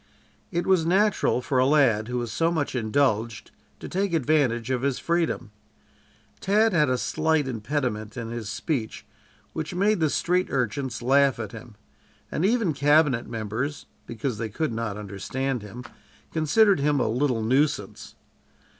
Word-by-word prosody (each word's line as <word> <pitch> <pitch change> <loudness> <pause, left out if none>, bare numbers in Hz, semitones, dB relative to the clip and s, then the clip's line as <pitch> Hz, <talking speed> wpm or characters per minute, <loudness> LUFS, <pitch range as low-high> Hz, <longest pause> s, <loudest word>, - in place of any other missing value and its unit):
It 175 +1 -1
was 185 -3 +3
natural 190 -7 +2
for 130 -1 0
a 130 - +4
lad 125 -8 +3
who 125 0 -3
was 120 -2 -3
so 165 +8 +1
much 155 -4 -1
indulged 115 -2 0 0.3
to - - -7
take 190 -1 -1
advantage 130 -5 +1
of 125 -2 0
his 140 -1 0
freedom. 170 -10 -1 0.9
Tad 215 +2 +2
had 150 -5 +3
a 125 - +1
slight 155 +1 0
impediment 115 -3 -3
in 115 -1 -5
his 115 -3 -5
speech 115 -1 -3 0.5
which 160 +2 -4
made 205 +2 +2
the 155 -2 +2
street 180 +5 +1
urchins 125 -1 -2
laugh 135 +1 +4
at 110 -3 -5
him, 115 0 -11 0.6
and 160 - -1
even 210 -4 +2
cabinet 145 -3 +3
members, 115 +6 -4 0.2
because 115 -1 -4
they 115 - -3
could 145 +5 -2
not 110 -2 -3
understand 115 +6 -3
him, 105 +5 -9 0.5
considered 190 +5 +3
him 145 0 +2
a - - +1
little 120 0 0
nuisance. 135 +6 -1
135 Hz, 155 wpm, -25 LUFS, 115-160 Hz, 0.9 s, a